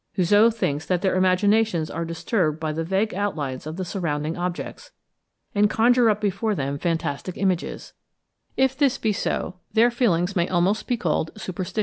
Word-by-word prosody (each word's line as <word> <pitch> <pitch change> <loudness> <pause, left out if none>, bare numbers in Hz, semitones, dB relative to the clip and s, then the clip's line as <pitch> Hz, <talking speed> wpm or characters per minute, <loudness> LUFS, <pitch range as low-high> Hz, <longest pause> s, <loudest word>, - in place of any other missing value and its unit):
Houzeau 205 +5 +5
thinks 150 -9 -2
that 180 0 0
their 190 - +2
imaginations 185 -1 +2
are 165 +1 -3
disturbed 165 -1 -1
by 160 -1 -2
the 160 +2 -2
vague 195 +6 0
outlines 150 -10 -3
of 160 +2 -6
the 185 - -3
surrounding 160 -4 -2
objects, 175 0 -5 0.6
and 205 0 +3
conjure 240 +1 +4
up 210 -1 +1
before 210 +1 -1
them 140 -2 -3
fantastic 165 +1 -2
images: 185 -3 -2 0.6
if 265 0 +2
this 275 -1 +2
be 215 -2 0
so, 185 -1 -2 0.2
their 235 +2 +4
feelings 195 -6 +1
may 175 -1 +2
almost 185 +4 +1
be 245 - 0
called 160 -4 0
superstitious. 185 +1 -4
185 Hz, 165 wpm, -24 LUFS, 165-215 Hz, 0.6 s, Houzeau